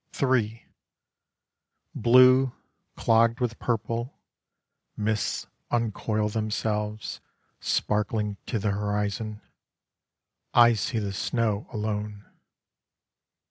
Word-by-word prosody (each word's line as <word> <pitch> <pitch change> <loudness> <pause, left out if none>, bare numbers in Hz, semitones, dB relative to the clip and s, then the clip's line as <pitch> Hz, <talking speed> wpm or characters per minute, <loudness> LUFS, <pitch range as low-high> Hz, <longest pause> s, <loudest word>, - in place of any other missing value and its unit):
III 115 -4 +1 1.3
Blue, 130 +2 +6 0.4
clogged 115 +1 +3
with 120 -3 -2
purple, 115 +2 -2 0.8
Mists 110 0 -1 0.2
uncoil 110 -2 0
themselves: 105 0 -2 0.4
Sparkling 105 -1 0
to 120 - -1
the 105 0 0
horizon, 105 +1 -2 1.1
I 120 -1 +7
see 115 +2 -2
the 100 -2 -2
snow 110 0 -1
alone. 105 -1 -4
110 Hz, 75 wpm, -26 LUFS, 105-115 Hz, 1.3 s, I